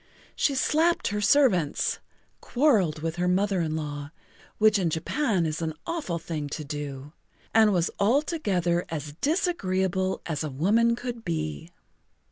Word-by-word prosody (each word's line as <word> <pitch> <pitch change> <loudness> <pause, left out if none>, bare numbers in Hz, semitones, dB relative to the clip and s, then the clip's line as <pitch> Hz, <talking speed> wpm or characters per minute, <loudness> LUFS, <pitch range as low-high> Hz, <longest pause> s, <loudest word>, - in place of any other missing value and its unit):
She 280 - +1
slapped 320 +6 +2
her 210 0 -2
servants, 205 - +3 0.4
quarreled 205 - +2
with 165 +1 -2
her 180 0 0
mother 190 +1 +1
in 155 -1 -1
law 145 -2 -5 0.5
(which 215 -1 +4
in 175 -3 +1
Japan 185 - 0
is 155 +1 -3
an 160 -1 -3
awful 310 - -3
thing 155 -3 -5
to 155 - -5
do), 145 -1 -6 0.4
and 220 -1 +5
was 175 -3 +1
altogether 200 - +1
as 150 -2 -5
disagreeable 190 - 0
as 160 -2 -2
a 155 - -3
woman 215 - +2
could 240 -1 -6
be. 80 - -3
180 Hz, 140 wpm, -26 LUFS, 155-230 Hz, 0.5 s, and